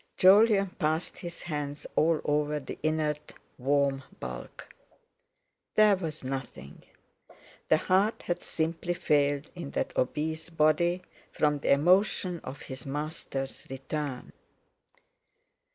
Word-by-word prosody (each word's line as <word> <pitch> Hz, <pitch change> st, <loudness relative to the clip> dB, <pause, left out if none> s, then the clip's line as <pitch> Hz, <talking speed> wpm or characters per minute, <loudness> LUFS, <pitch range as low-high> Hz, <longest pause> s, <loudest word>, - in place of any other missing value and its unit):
Jolyon 195 Hz, 0 st, +6 dB
passed 155 Hz, +2 st, -1 dB
his 170 Hz, -1 st, -8 dB
hands 150 Hz, -3 st, -4 dB
all 160 Hz, 0 st, +3 dB
over 150 Hz, 0 st, +1 dB
the 135 Hz, -, -8 dB
inert 155 Hz, -1 st, -1 dB, 0.2 s
warm 140 Hz, +1 st, +2 dB, 0.2 s
bulk. -, -, -7 dB, 1.1 s
There 215 Hz, -1 st, +6 dB
was 160 Hz, -6 st, -5 dB
nothing—the 130 Hz, -, -5 dB
heart 195 Hz, +6 st, +2 dB
had 175 Hz, 0 st, -2 dB
simply 165 Hz, +2 st, -2 dB
failed 145 Hz, -2 st, +1 dB
in 170 Hz, -5 st, -6 dB
that -, -, -1 dB
obese 155 Hz, +5 st, -1 dB
body 170 Hz, +3 st, +2 dB, 0.3 s
from 150 Hz, -1 st, +1 dB
the -, -, +1 dB
emotion 180 Hz, +3 st, +3 dB
of 135 Hz, +3 st, -7 dB
his 130 Hz, -1 st, -8 dB
master's 140 Hz, -1 st, -4 dB
return. 135 Hz, 0 st, -4 dB
155 Hz, 105 wpm, -29 LUFS, 140-175 Hz, 1.1 s, Jolyon